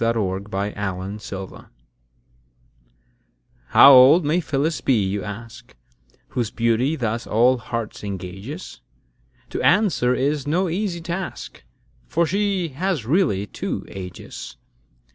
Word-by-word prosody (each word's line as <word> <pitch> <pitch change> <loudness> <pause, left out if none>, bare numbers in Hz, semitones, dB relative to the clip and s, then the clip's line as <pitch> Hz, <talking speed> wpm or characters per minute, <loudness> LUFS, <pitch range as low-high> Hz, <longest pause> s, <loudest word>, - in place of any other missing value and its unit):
Matthew 100 -4 0
Prior 100 +1 -3 0.4
Phyllis's - - -10
Age 95 -1 -7 2.0
HOW 140 - +8
old 140 +6 +8
may 155 +4 +2
Phyllis 150 0 -1
be, 130 - +2
you 100 -2 -1
ask, 115 - -9 0.5
Whose 125 -5 -2
beauty 115 +6 +1
thus 115 -4 -3
all 125 +4 +3
hearts 115 -2 -5
engages? 100 - -7 0.7
To - - -3
answer 175 - +3
is 145 +1 -1
no 175 +4 +1
easy 175 -1 -2
task; 175 +2 -6 0.4
For 170 - +1
she 195 0 0
has 160 - -2
really 135 - +1
two - - -5
ages. 90 -2 -8
125 Hz, 115 wpm, -22 LUFS, 105-165 Hz, 2.0 s, HOW